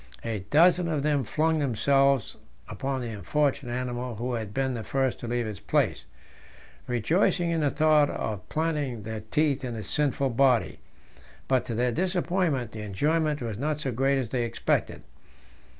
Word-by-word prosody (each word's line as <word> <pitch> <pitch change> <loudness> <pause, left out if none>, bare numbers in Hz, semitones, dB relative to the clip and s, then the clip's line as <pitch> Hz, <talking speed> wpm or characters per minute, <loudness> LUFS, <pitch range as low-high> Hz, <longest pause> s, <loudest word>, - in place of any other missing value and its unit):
A 115 -2 -2
dozen 175 +3 +5
of 155 -4 -1
them 145 -2 +1
flung 155 +6 +1
themselves 135 0 +2 0.3
upon 135 -1 -3
the 120 - -4
unfortunate 125 - -1
animal 125 -1 -3
who 120 +4 -3
had 110 -4 -3
been 130 +3 -1
the 115 -2 -4
first 135 0 -1
to 120 - -6
leave 120 0 -1
his 105 -4 -5
place, - - 0 0.8
rejoicing 170 - +1
in 165 -1 0
the 145 - +2
thought 150 -1 +4
of 105 -4 -4
planting 150 -8 -1
their 110 +1 -5
teeth 140 +6 0
in 120 -2 -4
his 110 -3 -6
sinful 140 -2 0
body. 125 -1 +2 0.7
But 130 -1 +2
to 115 - -3
their 125 +2 +1
disappointment 175 - 0
the 110 - -7
enjoyment 150 +8 0
was 110 -2 -4
not 150 +2 -1
so 140 -3 -2
great 135 +3 +1
as 130 -4 -2
they 125 0 -1
expected. 115 - -1
135 Hz, 165 wpm, -27 LUFS, 115-150 Hz, 0.8 s, dozen